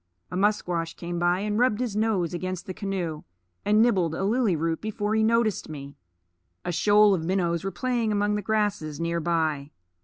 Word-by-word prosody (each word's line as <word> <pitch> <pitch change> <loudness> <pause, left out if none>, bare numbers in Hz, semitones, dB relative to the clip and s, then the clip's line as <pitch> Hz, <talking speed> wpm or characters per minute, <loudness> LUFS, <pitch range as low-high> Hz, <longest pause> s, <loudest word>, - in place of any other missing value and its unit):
A - - -4
musquash 180 -4 0
came 175 0 -4
by, 175 +2 +2
and 210 +1 -1
rubbed 245 -3 +3
his 245 -5 -2
nose 210 -6 0
against 185 +1 -4
the 185 - -5
canoe, 180 -6 -3 0.4
and 210 +2 +4
nibbled 185 -9 +2
a 190 - -2
lily 215 -2 +2
root 165 +1 -1
before 210 -1 -2
he 220 - +2
noticed 225 -4 +1
me. 140 -2 -8 0.7
A 175 - -1
shoal 205 +4 +5
of 170 -4 -1
minnows 170 -1 0
were 195 - -1
playing 230 +3 -1
among 205 0 +1
the 210 - -1
grasses 205 -8 -1
near 170 0 -1
by. 155 -4 0
190 Hz, 185 wpm, -26 LUFS, 170-210 Hz, 0.7 s, shoal